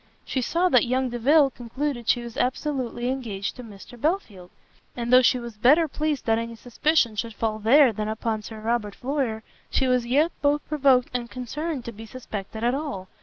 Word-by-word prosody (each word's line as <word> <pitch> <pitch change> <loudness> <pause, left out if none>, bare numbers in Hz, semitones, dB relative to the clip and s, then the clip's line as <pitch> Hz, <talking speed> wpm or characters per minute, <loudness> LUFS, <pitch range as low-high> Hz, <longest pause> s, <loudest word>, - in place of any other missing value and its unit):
She 260 - -2
saw 340 +8 +1
that 250 -5 +4
young 255 +1 0
Delvile 270 +4 +4
concluded 245 +1 -4
she 240 - +2
was 235 -1 -8
absolutely 255 -2 -1
engaged 225 -7 -3
to 250 - -9
Mr 225 +2 -13
Belfield, 225 - -2 0.5
and 240 0 -1
though 255 - +9
she 250 0 +4
was 235 -3 -8
better 295 +9 +5
pleased 305 -1 -2
that 225 0 +2
any 230 0 -5
suspicion 245 +1 +1
should 225 +1 -4
fall 215 -1 -2
there 250 +3 +5
than 215 +1 -3
upon 220 0 -2
Sir 220 +1 -9
Robert 220 -2 -1
Floyer, 255 -5 -2 0.3
she 265 - +1
was 250 -2 +1
yet 295 +7 +3
both 290 0 +1
provoked 270 -4 +3
and 240 -1 -3
concerned 265 +3 -4
to 235 - -5
be 225 0 -11
suspected 220 -3 -7
at 240 +1 +2
all. 270 -10 -4
245 Hz, 190 wpm, -25 LUFS, 225-275 Hz, 0.5 s, though